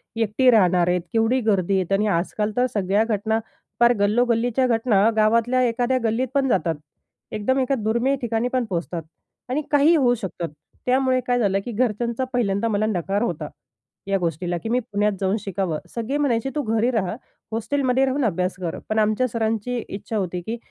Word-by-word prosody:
एकटी 225 +3 +2
राहणार 180 -5 +4
आहेत, 180 0 +1
केवढी 225 +3 +2
गर्दी 200 -4 +1
आहे. - - -2
आणि 210 +2 +2
आजकाल 205 +3 -1
तर 250 - +4
सगळ्या 200 +1 +2
घटना 220 0 0 0.4
पार 240 0 +6
गल्लो-गल्लीच्या 235 +4 +2
घटना 225 -3 +3
गावातल्या 230 +4 +3
एखाद्या 245 +2 0
गल्लीत 230 +3 0
पण 275 -1 +2
जातात. 170 -7 +1 0.6
एकदम 240 +6 0
एका 265 +1 +1
दुर्मिळ 235 +5 +1
ठिकाणी 230 0 0
पण 255 -2 +1
पोहचतात 170 -1 -3 0.5
आणि 270 +4 0
काहीही 295 +3 +5
होऊ 255 -6 +3
शकतात. 185 -6 -5 0.4
त्यामुळे 255 0 +2
काय 245 0 +2
झालं, 195 -4 +2
की 245 - -4
घरच्यांचा 235 +1 -1
पहिल्यांदा 215 -3 +1
मला 215 -1 +1
नकार 200 -1 -1
होता 165 -10 -2 0.6
या 195 0 +2
गोष्टीला, 175 0 -2
की 225 - -6
मी 245 +2 +2
पुण्यात 205 +1 +2
जाऊन 190 +1 +1
शिकावं. 190 -6 -2 0.2
सगळे 235 +5 -2
म्हणायचे 270 -4 0
तू 300 - +1
घरी 225 +1 +1
रहा. 215 -4 -1 0.4
हॉस्टेलमध्ये 260 +3 +1
राहून 265 0 0
अभ्यास 185 -2 -1
कर. 170 -2 -3
पण 215 0 +1
आमच्या 215 +4 +2
सरांची 225 +1 -2
इच्छा 205 +3 -5
होती, 180 -3 -2
की 225 +7 -4
225 Hz, 175 wpm, -23 LUFS, 195-245 Hz, 0.6 s, पार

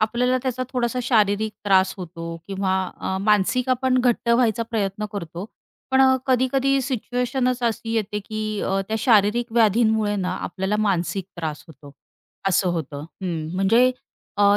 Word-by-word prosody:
आपल्याला 245 +4 +1
त्याचा 255 -1 -2
थोडासा 250 -1 -1
शारीरिक 215 -3 +2
त्रास 190 -1 +3
होतो 165 -2 -6
किंवा 195 -1 -1 0.3
अ, 190 - -2
मानसिक 210 +5 +2
आपण 255 0 +2
घट्ट 245 -1 +1
व्हायचा 235 -1 +3
प्रयत्न 210 -2 -2
करतो, 175 -2 -6 0.5
पण 265 0 +4
अ, 260 0 +6
कधी-कधी 265 +1 +2
सिच्युएशनच 250 0 -1
अशी 230 -1 -1
येते, 210 -2 -1
की 215 -1 -3
अ, 195 0 0
त्या 220 - 0
शारीरिक 225 0 +3
व्याधींमुळे 220 -1 +3
ना 185 -2 -2
आपल्याला 190 +3 -2
मानसिक 190 0 -1
त्रास 160 -3 -5
होतो. 145 -3 -14 0.6
असं 190 0 +2
होतं. 150 -4 -4 0.2
हं, 165 -4 -3
म्हणजे 225 +7 +4 0.5
अ, 205 0 +5
215 Hz, 145 wpm, -23 LUFS, 190-245 Hz, 0.6 s, अ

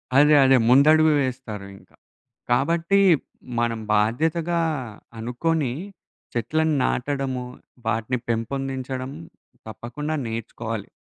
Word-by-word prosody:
అదే. 150 +2 +6
అదే. 135 0 +6
ముందడుగు 155 +4 +6
వేస్తారు 125 -6 -4
ఇంకా. - - -22 0.6
కాబట్టి 170 +9 +2 0.6
మనం 115 -1 0 0.2
బాధ్యతగా 160 +10 +1 0.6
అనుకోని 125 +4 -1 0.6
చెట్లను 155 +7 0
నాటడము, 130 -1 -1 0.4
వాటిని 115 +2 0
పెంపొందించడం. 130 +2 -3 0.6
తప్పకుండా 145 +8 -5
నేర్చుకోవాలి. 115 -1 -5
130 Hz, 80 wpm, -24 LUFS, 115-155 Hz, 0.6 s, అదే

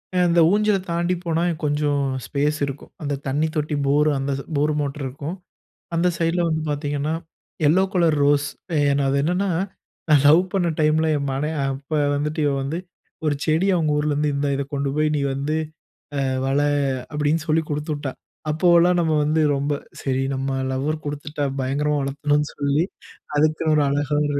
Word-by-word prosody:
அ - - +2
அந்த 170 0 +3
ஊஞ்சல 210 0 +3
தாண்டி 170 +2 +1
போனா, 165 -1 0 0.2
கொஞ்சம் 145 -1 +1 0.2
ஸ்பேஸ் 150 +2 0
இருக்கும். 140 0 -8
அந்த 145 -1 -2
தண்ணி 145 +4 +1
தொட்டி 150 0 -1
போரு 150 +2 +3
அந்தது 135 0 -2
போர் 150 +2 +2
மோட்ரு 140 0 -3
இருக்கும். 140 +6 -5 0.6
அந்த 170 +2 +3
சைட்ல 165 +1 +1
வந்து 160 -1 -1
பாத்தீங்கன்னா, 145 +1 -1 0.5
எல்லோ 170 +6 +5
கலர் 170 -4 +3
ரோஸ் 145 0 +3 0.3
ஏ - - +3 0.3
அது 140 +1 +2
என்னான்னா, 180 +5 0 0.6
நான் 150 -3 +5
லவ் 160 +4 +7
பண்ண 185 -3 +1
டைம்ல 155 +1 +3
என் 140 -1 -3
மனை 145 +3 -1
அ - - 0
அப்ப 135 +3 -12 0.2
வந்துட்டு 150 +2 -2
இவ 145 - +2
வந்து 145 +5 -3 0.5
ஒரு 150 -2 +2
செடி 160 +4 +2
அவுங்க 160 -4 +1
ஊர்லருந்து, 150 0 +1
"இந்தா 140 +1 0
இத 140 - -1
கொண்டு 140 0 -1
போய், 155 0 +2
நீ - - 0
வந்து, 140 +3 -2 0.7
அ - - +1 0.2
வள" 135 +1 +1 0.5
அப்பிடின்னு 150 +1 0
சொல்லி 160 +1 +3
குடுத்துவிட்டா! 145 -2 -3 0.4
அப்போவெல்லாம் 175 +2 +4
நம்ம 160 -2 +1
வந்து 155 +2 +2
ரொம்ப, 140 +1 -1 0.3
"சரி, 135 -1 0
நம்ம 135 0 -2 0.2
லவ்வர் 150 +4 -2
கொடுத்துட்டா" 145 0 -4 0.2
பயங்கரமா 145 +3 0
வளத்தணும்ன்னு 145 +2 0
சொல்லி 145 +2 +1 0.5
அதுக்குன்னு 155 +1 +2
ஒரு 150 - +4
அழகா 145 +1 0
ஒரு 145 -1 0
150 Hz, 165 wpm, -22 LUFS, 140-160 Hz, 0.7 s, லவ்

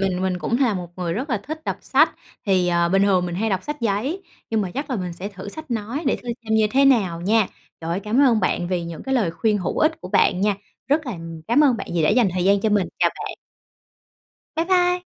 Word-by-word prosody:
Mình 185 -1 0
mình 185 -1 0
cũng 235 +7 -1
là 235 -6 +3
một 180 -2 -5
người 175 -2 -2
rất 260 - -3
là 225 - +1
thích 315 +2 -6
đọc - - -2
sách, - - +3 0.3
thì, 185 -2 +3
ờ, 170 0 +2
bình 195 +2 +3
thường 190 -3 +3
mình 175 - -4
hay 220 +4 -1
đọc 190 - 0
sách 295 0 -5
giấy, 235 - -1 0.3
nhưng 220 -1 +1
mà 185 -3 -2
chắc 280 +2 -4
là 255 - 0
mình 180 -3 -4
sẽ 185 +4 -6
thử 200 -1 -9
sách 310 +4 -8
nói 235 +6 -3
để - - +2
thử 245 - -12 0.2
xem 220 - 0
như 220 -1 +4
thế 275 +1 +4
nào 195 -11 +3
nha. 210 +2 +3 0.3
Trời 165 0 -4
ơi, 175 +3 -1
cảm 215 +6 +1
ơn 235 -5 +4
bạn 175 -1 0
vì 180 -2 -1
những 170 -1 -7
cái 265 - -1
lời 220 -10 +2
khuyên 210 +5 0
hữu 180 - -2
ích 315 +1 +2
của 180 - -8
bạn 180 - +3
nha. 205 0 +2 0.3
Rất 295 +1 +2
là 245 - -3 0.4
cám 285 +6 +5
ơn 260 -5 +4
bạn 200 - -6
vì 165 - +2
đã 155 - +3
dành 230 -1 +4
thời 180 -1 -1
gian 200 0 +4
cho 220 - +1
mình. 205 -3 +2
Chào - - +3
bạn. - - -6 1.2
Bye 325 - +1
bye! 360 0 +2
210 Hz, 265 wpm, -22 LUFS, 185-260 Hz, 1.2 s, cám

